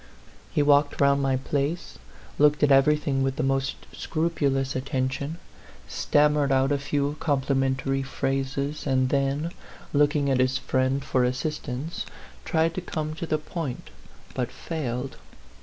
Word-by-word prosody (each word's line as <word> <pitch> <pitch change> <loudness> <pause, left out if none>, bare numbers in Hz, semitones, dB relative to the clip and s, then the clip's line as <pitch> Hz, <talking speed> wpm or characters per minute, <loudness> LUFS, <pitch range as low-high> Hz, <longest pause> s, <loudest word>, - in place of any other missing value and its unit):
He 145 - +2
walked 145 0 +3
round 140 0 +4
my 135 -1 +2
place, 140 +5 -2 0.4
looked 150 0 +4
at 145 - +5
everything 140 0 +4
with 135 0 0
the - - -1
most 135 0 0 0.2
scrupulous 140 -5 0
attention, 135 +3 -2 0.5
stammered 145 - +2
out 135 +1 +3
a 140 - +2
few 145 +1 -1
complimentary 135 -1 +1
phrases, 135 +2 -2
and 130 -1 +2
then, 140 +4 0 0.4
looking 145 0 +3
at 130 - +2
his 130 0 +2
friend 130 +2 0
for 130 -2 +2
assistance, 135 +3 -3 0.4
tried 165 0 +2
to 185 - -3
come 155 -3 -3
to 165 +1 -5
the 155 - +1
point, 155 -3 -5 0.4
but 125 -1 -2
failed. 135 -5 -4
140 Hz, 135 wpm, -26 LUFS, 135-150 Hz, 0.5 s, at